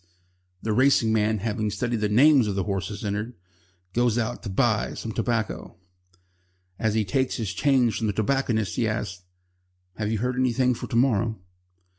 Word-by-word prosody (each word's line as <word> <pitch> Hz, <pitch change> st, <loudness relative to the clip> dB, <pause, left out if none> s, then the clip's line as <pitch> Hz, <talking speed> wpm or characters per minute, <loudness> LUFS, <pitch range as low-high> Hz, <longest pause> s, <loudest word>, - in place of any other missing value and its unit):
The 110 Hz, -, 0 dB
racing 125 Hz, -2 st, +3 dB
man, 110 Hz, 0 st, +2 dB
having 105 Hz, +1 st, -2 dB
studied 120 Hz, +1 st, -2 dB
the 105 Hz, -, +1 dB
names 130 Hz, +2 st, +5 dB
of 100 Hz, -, -2 dB
the 95 Hz, -, 0 dB
horses 100 Hz, +2 st, -4 dB
entered, 105 Hz, +4 st, -3 dB, 0.6 s
goes 120 Hz, -1 st, +2 dB
out 120 Hz, +1 st, -2 dB
to 110 Hz, -, -6 dB
buy 105 Hz, +1 st, +1 dB
some 115 Hz, -, -5 dB
tobacco. 115 Hz, 0 st, -2 dB, 1.0 s
As 110 Hz, -1 st, 0 dB
he 110 Hz, -1 st, +1 dB
takes 130 Hz, +7 st, 0 dB
his 110 Hz, -7 st, -3 dB
change 125 Hz, -1 st, +2 dB
from 110 Hz, -, -1 dB
the 105 Hz, -, 0 dB
tobacconist, 110 Hz, -2 st, 0 dB
he 115 Hz, -, +1 dB
asks: 105 Hz, -4 st, -3 dB, 0.8 s
"Have 105 Hz, 0 st, -2 dB
you 110 Hz, -, 0 dB
heard 125 Hz, +3 st, -2 dB
anything 125 Hz, 0 st, +2 dB
for -, -, -6 dB
to -, -, -4 dB
morrow?" 115 Hz, -3 st, +2 dB
110 Hz, 170 wpm, -25 LUFS, 105-125 Hz, 1.0 s, names